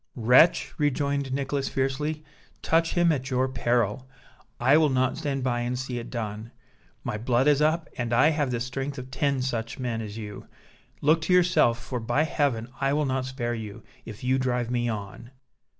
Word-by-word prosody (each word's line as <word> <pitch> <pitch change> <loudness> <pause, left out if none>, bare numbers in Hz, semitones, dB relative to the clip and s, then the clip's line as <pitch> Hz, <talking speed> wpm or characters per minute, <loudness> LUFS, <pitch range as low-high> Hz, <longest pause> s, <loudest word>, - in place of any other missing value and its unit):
"Wretch," 125 +8 +4
rejoined 140 -1 0
Nicholas, 135 +1 -1
fiercely, 150 +3 -2 0.4
"touch 165 0 +2
him 175 -1 +4
at 135 -3 -2
your 130 0 +1
peril! 120 -1 0 0.5
I 130 +4 +5
will 155 -1 +4
not 130 -1 +1
stand 135 -3 -3
by 120 -2 0
and 120 +1 -2
see 125 -1 -4
it 115 - -8
done. 110 -1 -5 0.5
My 105 - -3
blood 120 +3 +1
is 145 -1 +4
up, 160 +2 +2
and 120 -1 -2
I 125 +6 +5
have 150 -4 0
the 120 -2 -1
strength 135 +3 -4
of 130 0 -8
ten 135 0 0
such 115 -3 -3
men 120 -3 -3
as 105 -1 -7
you. 105 -2 -8 0.5
Look 155 +3 +3
to 180 - +1
yourself, 170 -10 +4
for 125 0 -5
by 120 +6 +1
Heaven 140 -7 0
I 135 0 +2
will 150 0 +1
not 130 -1 -1
spare 120 -2 -3
you, 110 -1 -7 0.2
if 110 +1 -10
you 130 +1 +2
drive 125 -2 -1
me 120 -1 0
on!" 105 +2 -6
130 Hz, 185 wpm, -26 LUFS, 120-140 Hz, 0.5 s, I